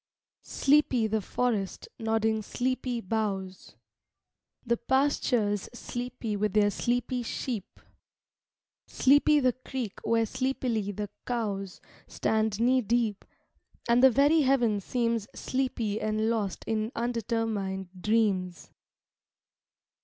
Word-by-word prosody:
Sleepy 275 -5 +2
the 220 0 0
forest, 210 -2 -2
nodding 220 -1 +1
sleepy 250 +1 -2
boughs; 195 -3 -3 0.9
The 235 0 +1
pastures 240 -6 +1
sleepy 245 -3 -4
with 205 -1 -1
their 205 -1 +4
sleepy 245 +3 -1
sheep; 230 -3 -5 1.1
Sleepy 290 +2 +4
the 255 -3 +2
creek 255 -4 -6
where 230 0 +2
sleepily 240 -4 -1
the 205 0 -5 0.2
cows 200 -6 -3 0.3
Stand 220 -1 0
knee 255 +2 +3
deep: 225 -2 0 0.6
and 235 +1 +4
the 265 - +8
very 285 +5 +4
heaven 245 -6 +2
seems 230 0 -1
Sleepy 245 -5 -2
and 215 +1 0
lost 205 -5 -2
in 220 0 -1
undetermined 225 -5 -2
dreams. 195 -5 0
225 Hz, 100 wpm, -28 LUFS, 210-250 Hz, 1.1 s, the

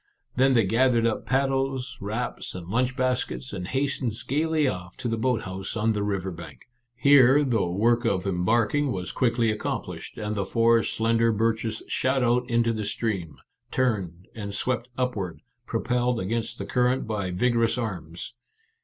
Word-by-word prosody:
Then 130 +1 +4
they 115 - +5
gathered 115 +3 +3
up 115 - -1
pad 135 +1 +2
dles, 135 -1 -2
wraps, 110 +2 -3
and 90 -2 -7
lunch 125 +6 0
baskets, 130 -1 -1
and 90 -2 -4
hastened 130 -2 -1
gaily 155 +1 +1
off 90 -6 -4
to - - -4
the 115 - 0
boat 115 +1 0
house 95 +3 -5
on 110 +1 +2
the 105 - -2
river 95 -2 -1
bank. 85 -1 -10 0.3
Here 140 +1 +6
the 115 -9 +1
work 115 +7 +2
of 100 -6 0
embarking 110 +9 +1
was 90 -4 -3
quickly 115 -2 +2
accomplished, 105 - -5
and 105 0 -3
the 100 - 0
four 115 +3 +3
slender 115 +1 +1
birches 110 0 -1
shot 130 0 +1
out 125 +1 +2
into 115 -1 +2
the 110 -1 -3
stream, 100 -6 -2 0.3
turned, 95 -9 -1
and 100 -3 -5
swept 120 +3 -1
upward, 105 -9 -2 0.3
propelled 125 +1 0
against 110 +4 -2
the 100 - -5
current 125 +3 +1
by 105 -4 -2
vigorous 115 +5 +1
arms. 90 -5 -5
115 Hz, 160 wpm, -26 LUFS, 100-125 Hz, 0.3 s, Here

